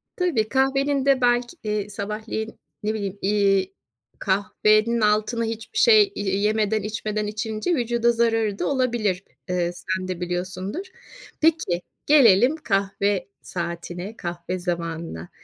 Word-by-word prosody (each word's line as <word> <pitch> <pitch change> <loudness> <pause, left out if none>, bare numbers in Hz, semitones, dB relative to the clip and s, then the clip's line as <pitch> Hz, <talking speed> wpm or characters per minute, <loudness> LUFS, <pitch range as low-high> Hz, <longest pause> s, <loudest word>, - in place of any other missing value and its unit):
Tabii. 285 - 0
Kahvenin 270 +1 +1
de 275 -2 +4
belki, 245 +5 +1
ııı, 210 -1 -1
sabahleyin, 215 +2 -5 0.2
ne 215 +1 0
bileyim, 200 -2 -4
iii, 195 -1 +2 0.5
kahvenin 215 +4 +2
altına 215 +2 +2
hiçbir 225 - -5
şey 430 -3 +6
y 195 -1 -1
yemeden 215 +1 +1
içmeden 210 0 -2
içince 215 +7 -2
vücuda 235 -2 +2
zararı 225 -3 +1
da - - 0
olabilir. 235 -8 0 0.3
Iıı, 175 -1 0
sen 185 +1 -3
de 185 -1 -4
biliyorsundur. 185 - -3 0.6
Peki, 310 - +2 0.2
gelelim 250 -2 +6
kahve 195 - 0
saatine, 175 +3 -5
kahve 175 +1 -4
zamanına. 165 - -4
210 Hz, 120 wpm, -24 LUFS, 190-235 Hz, 0.6 s, şey